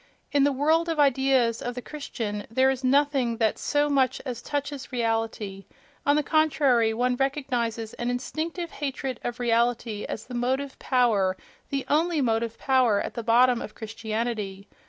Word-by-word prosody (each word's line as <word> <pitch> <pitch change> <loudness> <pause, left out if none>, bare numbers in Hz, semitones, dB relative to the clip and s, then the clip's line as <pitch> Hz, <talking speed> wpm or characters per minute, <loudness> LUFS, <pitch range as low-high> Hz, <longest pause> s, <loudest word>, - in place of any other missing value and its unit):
In 285 -1 +4
the 285 - +3
world 315 +5 +2
of 325 -2 -1
ideas 265 -4 +3
of 245 0 -4
the 250 - -4
Christian 220 -8 -5
there 260 +4 +3
is 265 0 -4
nothing 265 -3 +2
that 220 -2 +1
so 290 0 +1
much 270 -3 +2
as 245 -3 -4
touches 285 -2 -4
reality: 225 -5 -2 0.4
on 285 - +5
the 300 - +2
contrary, 280 -7 +3
one 250 +2 +1
recognizes 245 -5 -1
an 240 - -3
instinctive 320 +7 -3
hatred 270 -2 -4
of 240 +1 -4
reality 235 -2 0
as 220 - -5
the 250 - -10
motive 260 +3 -1
power, 215 -8 +2 0.3
the 275 -1 -2
only 325 +2 +2
motive 230 -3 0
power 255 -6 +3
at - - -4
the 235 - -4
bottom 240 +2 +4
of 215 - -8
Christianity. 220 -2 -4
250 Hz, 160 wpm, -26 LUFS, 230-280 Hz, 0.4 s, on